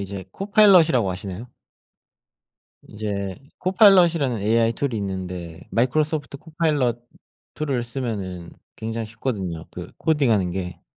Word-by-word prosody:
이제 100 -1 -6
코파일럿이라고 180 - +4
아시나요? 95 +6 -7 1.4
인제 100 -3 -4 0.2
코파일럿이라는 175 - +4
AI 115 +2 +2
툴이 130 -1 -2
있는데 90 -4 -5
마이크로소프트 145 +4 0
코파일럿 150 -6 0 0.6
툴을 135 -6 -2
쓰면은 100 -9 -5 0.3
굉장히 115 0 -4
쉽거든요 100 -8 -4
그 90 - -9
코딩하는 120 - +2
게. 90 -2 -5
115 Hz, 315 characters per minute, -23 LUFS, 95-150 Hz, 1.4 s, 코파일럿이라고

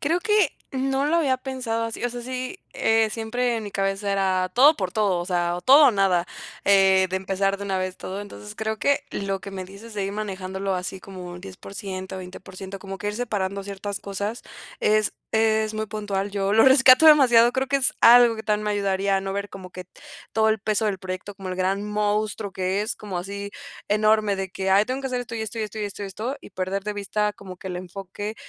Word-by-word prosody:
Creo 330 +5 +1
que 420 -6 +3 0.2
no 270 +1 0
lo 320 +3 +2
había 275 -6 +2
pensado 255 -3 -3
así, 230 +1 -5
o 245 - 0
sea, 245 - -6
sí, 255 +7 -5
eh, 225 0 +2
siempre 235 +2 -1
en 225 - -4
mi 205 - -6
cabeza 195 +1 -1
era 185 -2 +1
todo 285 +5 +7
por 185 -3 -2
todo, 200 -5 +1
o 175 - -3
sea, 175 -2 0
o 180 - -5
todo 280 +6 +7
o - - +6
nada, 190 -4 +2 0.4
eh, 190 -1 +5
de 190 - 0
empezar 195 +1 0
de 200 - -7
una 195 -1 -1
vez 185 0 -3
todo. 190 +2 -6
Entonces, 105 - -9
creo 220 0 -2
que 285 0 +1
lo 195 -1 -3
que 200 - -8
me 190 -1 -5
dices 200 +4 -12
de 200 -2 -1
ir 195 - -3
manejándolo 195 -2 -3
así 180 +1 -4
como 190 -3 -9
un 175 0 -8
10% 190 0 -7
20% 190 +1 -9
como 195 -1 -7
que - - -5
ir 210 - -3
separando 200 -4 -2
ciertas 200 0 -5
cosas 200 +3 -4 0.4
es 215 0 +2 0.2
es 220 -1 +2
muy 215 0 -2
puntual. 205 -2 -3
Yo 200 0 -1
lo 220 +1 +6
rescato 265 +2 +7
demasiado, 245 -6 +7
creo 265 +1 0
que 280 - -1
es 270 -1 +1
algo 235 -1 +7
que 220 - -7
también 210 0 0
me 210 - 0
ayudaría, 195 -1 +1
¿no?, 195 0 -4
ver 200 +1 -3
como 190 -1 -10
que 185 0 -8 0.5
todo 220 0 +3
el 220 -1 +1
peso 215 +1 0
del 195 -2 -1
proyecto, 185 +2 -6
como 190 -1 -8
el 185 - -4
gran 190 +2 0
monstruo 210 0 -1
que 190 +2 -1
es, 215 - -2
como 200 -4 -6
así 200 +2 -5 0.4
enorme 215 -1 +3
de 190 -1 -4
que: 190 0 -2
"Ay, 195 +2 +5
tengo 255 +4 -3
que 270 - -3
hacer 250 -1 -2
esto, 240 -1 -7
y 220 - -2
esto, 220 +1 -5
y 220 - 0
esto, 215 +1 -6
y - - -1
esto, 205 0 -6
y - - -4
esto, 200 +3 -7
y 250 - 0
esto", 280 - -4
y - - -13
perder 190 +1 -3
de 210 - -2
vista 210 +1 -1
como 190 -2 -11
que 185 - -11
el 180 - -4
enfoque, 195 +3 -6
205 Hz, 235 wpm, -24 LUFS, 190-225 Hz, 0.5 s, todo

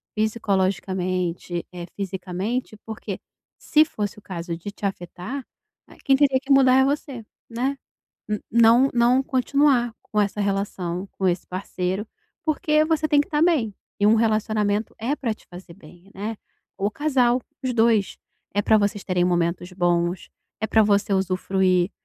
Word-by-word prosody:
psicologicamente, 185 -5 -1
eh, 175 -1 -7
fisicamente, 195 +5 -3
porque 220 -1 -6 0.4
se 310 0 +4
fosse 210 -8 -4
o - - -13
caso 170 -3 -5
de 190 +5 -7
te 205 - -7
afetar, 195 +7 -5 0.4
né, - - -17
quem 270 - +4
teria 270 -1 +3
que 275 +1 -5
mudar 265 -2 +6
é - - +5
você, 275 -4 -3 0.2
né. 255 +4 -2 0.5
N 210 -1 -1
não 235 +3 +6
não 245 +2 +4
continuar 265 -2 +2
com 210 - -1
essa 205 0 -1
relação, 195 -2 -2
com 190 - -2
esse 175 0 -1
parceiro, 185 +2 -3 0.4
porque 305 -1 +2
você 315 -1 +1
tem 290 -1 +4
que 285 - -1
estar 300 0 0
bem, 290 - +2 0.2
e 205 - +3
um 215 - +6
relacionamento 215 -1 +1
é 240 +6 -1
pra 235 -7 -2
te - - -24
fazer 180 -1 -11
bem, 175 +2 -17
né. 215 +3 -4 0.4
O 200 +2 0
casal, 255 -2 +2 0.2
os 255 -1 -1
2, 225 -4 +2 0.4
é 205 - +2
pra 220 +1 +4
vocês 205 0 0
terem 180 -1 +1
momentos 175 0 0
bons, 175 0 0 0.3
é 220 - 0
pra 220 +1 +4
você 205 -1 +2
usufruir, 185 -1 +1
210 Hz, 160 wpm, -23 LUFS, 185-250 Hz, 0.5 s, mudar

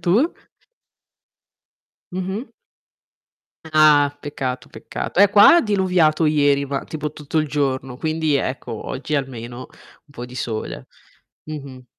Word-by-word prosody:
Tu? 220 - +2 1.8
Mh-mh. 190 +6 -4 1.2
Ah, 145 -2 +5
peccato, 130 -3 -5
peccato. - - -3
Eh 200 - +8
qua 205 - +8
ha - - +6
diluviato 180 - +2
ieri, 145 -2 +3
ma 140 0 -3
tipo 150 -1 -5
tutto 150 +1 -6
il 155 - +2
giorno, 135 -3 -2
quindi 155 -1 0
ecco 130 -2 -3
oggi 140 +3 -4
almeno 125 -3 -4
un 145 - -22
po' 120 -4 -8
di 125 0 -11
sole. 115 -3 -4 0.6
Mh-mh. 140 -4 -8
145 Hz, 120 wpm, -21 LUFS, 135-160 Hz, 1.8 s, Eh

